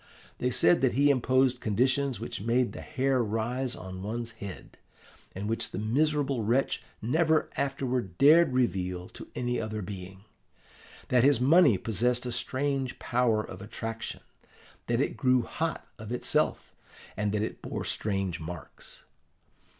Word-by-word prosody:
They 125 - +1
said 170 +6 +4
that 130 -2 +3
he 140 +4 +4
imposed 130 -1 +2
conditions 130 +5 +1
which - - -5
made 120 +3 +1
the - - -7
hair 130 -1 +1
rise 120 +4 -2
on 95 0 -8
one's 115 +3 -3
head, 100 -4 -9 0.6
and 100 +2 -4
which 115 +1 -1
the - - -6
miserable 135 +3 +1
wretch 120 +6 +1 0.2
never 160 +6 +2
afterward 130 -8 -2
dared 155 +2 +6
reveal 90 -8 -1
to - - -10
any 125 -1 -1
other 110 -1 -4
being; 95 0 -8 0.9
that 125 -1 +4
his 140 -3 +5
money 135 - +6
possessed 120 +5 0
a 125 - -2
strange 130 +2 -1
power 120 -3 +1
of 95 -2 -9
attraction; 115 +2 -5 0.7
that 120 +2 +1
it - - -1
grew 130 -2 +3
hot 165 +6 -3
of 110 0 -8
itself, 125 - 0 0.4
and 105 0 -1
that 105 0 0
it - - -5
bore - - -4
strange 95 -5 -1
marks. 80 -2 -8
120 Hz, 145 wpm, -29 LUFS, 105-130 Hz, 0.9 s, dared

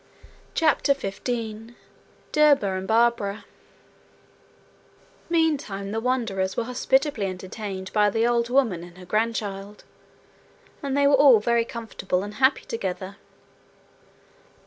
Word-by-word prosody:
CHAPTER 300 -3 +3
15 225 0 -5 0.6
Derba 290 -10 +4
and 190 0 -4
Barbara 220 -3 +1 1.8
Meantime 285 - 0
the 220 - -1
wanderers 225 -6 -1
were - - +1
hospitably 255 -1 0
entertained 190 +1 -6
by 210 -1 +4
the 225 +3 +1
old 235 0 +1
woman 235 -10 +1
and 175 0 -13
her 180 - -11
grandchild 210 -1 -2 1.0
and 275 -1 -2
they 285 - +3
were 280 - +4
all 275 -4 +7
very 235 +2 +1
comfortable 220 -6 -3
and 205 +1 -7
happy 265 +1 +3
together. 195 -2 -5
225 Hz, 110 wpm, -24 LUFS, 195-255 Hz, 1.8 s, all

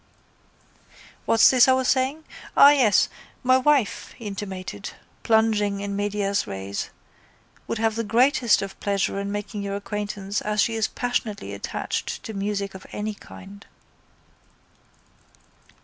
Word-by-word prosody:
—What's 225 - +6
this 255 -1 +6
I 260 - +6
was 260 -1 +1
saying? 265 +4 +1 0.3
Ah, 285 - +9
yes! 250 -8 +4 0.4
My 255 +1 +5
wife, 275 -4 +1
he 235 - -11
intimated, 190 - -6 0.3
plunging 215 -3 +2
in 200 0 -4
medias 205 0 -1
res, 100 0 -5 0.8
would - - -2
have 225 0 +1
the 230 +1 -2
greatest 235 0 +3
of 195 -1 -8
pleasure 200 -1 -1
in 200 0 -3
making 205 0 -4
your 200 0 -3
acquaintance 205 -1 -4
as 210 0 -2
she 225 +3 +3
is 220 -1 0
passionately 220 - -3
attached 100 - -4
to 220 - -7
music 200 0 -3
of 190 - -11
any 210 +1 -3
kind. 200 0 -13
210 Hz, 135 wpm, -24 LUFS, 200-230 Hz, 0.8 s, Ah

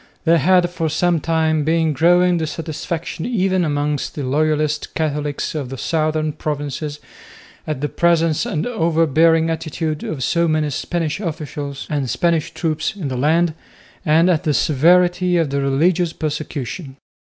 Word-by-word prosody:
There 165 0 +4
had 180 +4 +4
for 165 -2 -2
some 170 +2 +1
time 160 -1 +1
been 160 0 +1
growing 175 +4 +4
dissatisfaction 160 +1 -4
even 190 -6 +1
amongst 145 -2 -1
the 145 - -4
loyalist 150 +2 0
Catholics 150 -2 -2
of 145 -5 -4
the 135 - -6
southern 155 +1 0
provinces 145 0 -4 0.7
at 155 -4 -3
the 150 - 0
presence 165 -1 +2
and 155 - -2
over 165 -9 +1
bearing 165 +2 +3
attitude 160 -1 -3
of 140 -5 -4
so 170 +4 +1
many 155 -2 0
Spanish 165 +4 -2
officials 150 -6 -5
and 140 -4 -2
Spanish 165 +4 +1
troops 160 +5 -2
in 170 -9 -4
the 130 - -3
land 160 +5 +2 0.5
and 160 +3 +4
at 175 -4 +2
the 150 -2 +1
severity 175 +7 +3
of 160 -5 0
the 140 0 0
religious 165 +5 +1
persecution. 145 -2 -5
155 Hz, 150 wpm, -19 LUFS, 150-170 Hz, 0.7 s, There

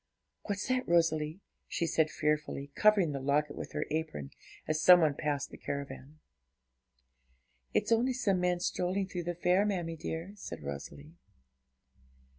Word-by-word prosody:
What's 205 -1 -2
that, 255 0 0
Rosalie?' 165 0 +2 0.3
she 170 - -1
said 160 -1 +2
fearfully, 150 -2 -1
covering 205 -5 +4
the 140 - -3
locket 145 +2 +1
with - - -7
her - - -1
apron, 150 - -3 0.4
as 155 0 0
some 180 -1 +9
one 155 -3 +3
passed 145 -1 -2
the - - -11
caravan. 140 +1 -6 1.6
'It's - - +1
only 240 +3 +3
some 215 -7 +1
men 180 0 +1
strolling 185 +2 0
through 180 -3 -5
the 175 0 -2
fair, 180 +3 +3
mammie 175 -5 -1
dear,' 165 +3 -5
said 135 - -7
Rosalie. 140 - -8
165 Hz, 145 wpm, -31 LUFS, 150-185 Hz, 1.6 s, some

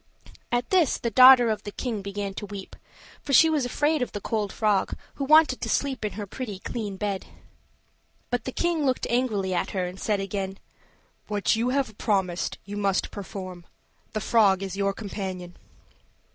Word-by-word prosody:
At 240 0 -1
this 355 -7 +3
the 235 - -3
daughter 255 -2 +8
of 215 -1 -2
the 205 - -7
king 225 -2 -3
began 200 0 -4
to 205 +1 -6
weep; 200 -1 -8 0.5
for 280 - -4
she 320 +5 +7
was 295 -5 +1
afraid 295 +3 +1
of 250 - -2
the 205 - -3
cold 210 -1 -2
frog, 210 -3 +1 0.2
who 280 - -2
wanted 305 -2 +5
to - - -3
sleep 270 -4 -1
in 210 - -2
her 205 0 -5
pretty 210 0 -6
clean 205 0 -5
bed. 200 -1 -3 1.0
But 245 -2 -1
the 260 - -3
king 340 +1 0
looked 260 -2 +1
angrily 215 -7 0
at 175 - -1
her, 185 - +1
and 180 +2 -7
said 210 -2 0
again: 195 0 -3 0.7
"What 210 +1 +1
you 230 +3 0
have 255 -5 -1
promised 190 -5 0
you 205 +1 -6
must 200 -2 0
perform. 185 -3 -7 0.5
The 215 - -2
frog 200 -4 +3
is 195 -1 -4
your 200 0 +1
companion." 190 -4 -6
210 Hz, 180 wpm, -26 LUFS, 195-250 Hz, 1.0 s, daughter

